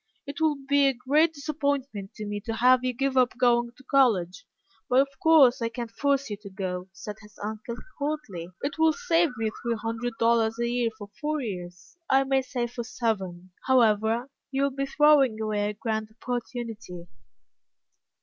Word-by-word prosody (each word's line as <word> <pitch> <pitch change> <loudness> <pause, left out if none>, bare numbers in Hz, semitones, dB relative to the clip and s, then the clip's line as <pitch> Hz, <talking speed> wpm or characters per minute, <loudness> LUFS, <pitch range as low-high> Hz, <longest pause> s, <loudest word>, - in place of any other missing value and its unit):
"It 280 +2 -7
will 310 -2 +3
be 285 0 +4
a 270 - +1
great 295 +6 +3
disappointment 280 -8 -3
to 215 - -6
me 205 0 -4
to 225 - -1
have 250 +2 +5
you 255 - +1
give 270 +2 -1
up 255 -1 +3
going 240 -1 +3
to 265 - -16
college, 225 -10 +2 0.4
but 250 - +5
of 275 +1 +3
course 290 -7 +6
I 230 - 0
can't 235 -1 -6
force 280 +2 0
you 205 - -3
to 200 0 -11
go," 185 -1 -4
said 205 +2 -8
his 210 -1 -17
uncle, 215 +2 -5 0.2
coldly. 280 - -4
"It 285 +2 -3
will 320 0 +5
save 345 -7 +2
me 220 -1 -1
three 235 -1 -1
hundred 230 +2 -3
dollars 230 -1 +2
a 235 0 0
year 240 -1 +1
for 205 -2 -9
four 300 0 -1
years 180 - -7
I 270 0 +5
may 270 0 +2
say 250 -1 -3
for 240 0 -5
seven, 195 -7 -3 0.2
however. 230 0 +3 0.2
You 275 0 0
will 280 - +1
be 275 +1 -3
throwing 275 -5 +4
away 210 -1 -1
a - - -4
grand 220 0 -3
opportunity." 230 -7 -5
240 Hz, 180 wpm, -27 LUFS, 215-275 Hz, 0.4 s, course